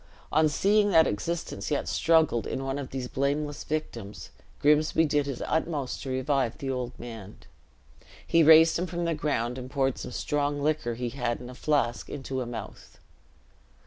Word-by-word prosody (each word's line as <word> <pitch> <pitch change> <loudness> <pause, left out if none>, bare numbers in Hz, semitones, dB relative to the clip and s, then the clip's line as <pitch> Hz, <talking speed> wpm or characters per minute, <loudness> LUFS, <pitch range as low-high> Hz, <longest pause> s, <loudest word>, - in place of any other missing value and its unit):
On 155 0 +4
seeing 205 +7 +3
that 165 -4 +6
existence 165 +12 -3
yet 145 - -1
struggled 160 -8 +2
in 135 - -3
one 135 +1 -2
of 135 - -6
these 130 -2 -4
blameless 145 +3 -2
victims, 115 -9 -5 0.3
Grimsby 150 +2 +3
did 145 -1 +1
his 135 -3 -4
utmost 155 -5 -2
to 135 - -6
revive 130 -2 0
the 135 -3 -3
old 125 -1 -4
man. 115 -4 -9 0.9
He 165 - +4
raised 160 +1 +7
him 180 - -1
from 175 -1 -3
the 170 - +1
ground, 130 -5 -1
and 130 0 -8
poured 135 -2 0
some - - -6
strong 145 +3 -1
liquor 145 -6 0
he 120 +1 -3
had 120 -2 -2
in 125 0 -9
a - - -10
flask 125 -4 0
into 135 -2 -4
a 125 - -4
mouth. 115 -3 -8
140 Hz, 175 wpm, -27 LUFS, 125-155 Hz, 0.9 s, raised